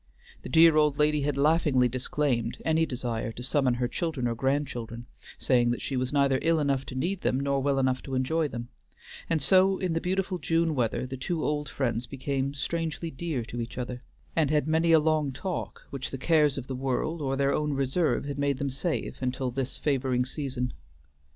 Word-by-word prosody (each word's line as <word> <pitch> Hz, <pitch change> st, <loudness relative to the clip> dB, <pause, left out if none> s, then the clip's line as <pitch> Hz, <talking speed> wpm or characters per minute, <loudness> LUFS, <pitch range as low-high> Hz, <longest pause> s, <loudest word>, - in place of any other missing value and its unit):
The -, -, -8 dB
dear 160 Hz, +2 st, +6 dB
old 150 Hz, -2 st, +3 dB
lady 150 Hz, 0 st, +3 dB
had 140 Hz, 0 st, -1 dB
laughingly 145 Hz, -3 st, +3 dB
disclaimed 125 Hz, -1 st, -1 dB
any 160 Hz, 0 st, +2 dB
desire 120 Hz, -2 st, -3 dB
to 120 Hz, -, -8 dB
summon 130 Hz, -1 st, +2 dB
her 120 Hz, 0 st, 0 dB
children 145 Hz, -2 st, -2 dB
or 120 Hz, -, 0 dB
grandchildren, 120 Hz, -3 st, -2 dB, 0.3 s
saying 120 Hz, -2 st, +3 dB
that 120 Hz, -, -1 dB
she 135 Hz, -, -2 dB
was 130 Hz, 0 st, -1 dB
neither 140 Hz, -2 st, +3 dB
ill 165 Hz, 0 st, +3 dB
enough 140 Hz, -2 st, 0 dB
to 130 Hz, -, -7 dB
need 180 Hz, +8 st, -1 dB
them, 130 Hz, -, +1 dB
nor 140 Hz, 0 st, 0 dB
well 140 Hz, 0 st, +1 dB
enough 130 Hz, -1 st, +1 dB
to 135 Hz, -, -3 dB
enjoy 155 Hz, +5 st, +1 dB
them; 120 Hz, -3 st, -6 dB, 0.6 s
and 160 Hz, -4 st, +1 dB
so 190 Hz, +2 st, +5 dB
in 180 Hz, -3 st, -1 dB
the 165 Hz, -, 0 dB
beautiful 185 Hz, 0 st, -1 dB
June 165 Hz, -1 st, +1 dB
weather 125 Hz, -3 st, 0 dB
the 130 Hz, +1 st, -6 dB
two 160 Hz, +5 st, -2 dB
old 150 Hz, 0 st, -1 dB
friends 125 Hz, -2 st, -2 dB
became 135 Hz, 0 st, -2 dB
strangely 165 Hz, +2 st, -3 dB
dear 145 Hz, -5 st, -3 dB
to 120 Hz, +1 st, -5 dB
each 115 Hz, +1 st, -7 dB
other, 125 Hz, 0 st, -4 dB, 0.3 s
and 160 Hz, -4 st, +2 dB
had 150 Hz, -1 st, +2 dB
many 160 Hz, +1 st, +3 dB
a 165 Hz, -, +8 dB
long 155 Hz, -2 st, +2 dB
talk 180 Hz, +8 st, -5 dB
which 135 Hz, -1 st, -4 dB
the 135 Hz, -, -5 dB
cares 150 Hz, 0 st, +3 dB
of 130 Hz, -, -4 dB
the 130 Hz, -, -5 dB
world 135 Hz, +5 st, -2 dB
or 135 Hz, -1 st, 0 dB
their 140 Hz, 0 st, +2 dB
own 150 Hz, -1 st, 0 dB
reserve 140 Hz, +4 st, +1 dB
had 140 Hz, 0 st, -4 dB
made 140 Hz, -1 st, +1 dB
them 140 Hz, 0 st, -2 dB
save 155 Hz, +6 st, -2 dB
until 130 Hz, 0 st, -1 dB
this 130 Hz, +1 st, -3 dB
favoring 130 Hz, -3 st, +1 dB
season. 130 Hz, -2 st, -3 dB
140 Hz, 200 wpm, -28 LUFS, 130-155 Hz, 0.6 s, a